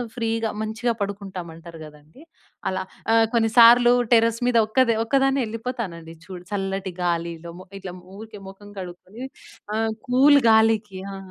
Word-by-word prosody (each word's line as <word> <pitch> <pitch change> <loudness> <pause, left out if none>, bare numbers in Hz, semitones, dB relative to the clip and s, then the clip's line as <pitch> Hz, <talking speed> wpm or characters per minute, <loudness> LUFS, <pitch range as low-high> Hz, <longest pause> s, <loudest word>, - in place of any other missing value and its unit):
ఫ్రీగా 225 -2 -2
మంచిగా 225 +2 -2
పడుకుంటామంటారు 175 -5 -8
గదండీ! 150 - -17 0.5
అలా 190 0 -3 0.3
ఆహ్, 225 0 +5
కొన్నిసార్లు 235 +1 +6 0.2
టెర్రస్ 230 0 +3
మీద 245 -1 +2
ఒక్క 255 +3 +2 0.2
ఒక్కదాన్నే 270 +1 +1
ఎళ్ళిపోతానండి 220 -9 -6
చూడు 180 -2 -10
చల్లటి 195 -2 -3
గాలిలో 170 -1 -3 0.3
ఇట్లా 185 -2 -8 0.2
ఊరికే 215 -2 -11
మొఖం 205 +1 -14
కడుక్కొని. 185 +6 -10 0.5
ఆ! - - -1 0.3
కూల్ 280 +3 +6
గాలికి 220 -3 +2 0.2
ఆ! - - -7
215 Hz, 120 wpm, -23 LUFS, 180-230 Hz, 0.5 s, కొన్నిసార్లు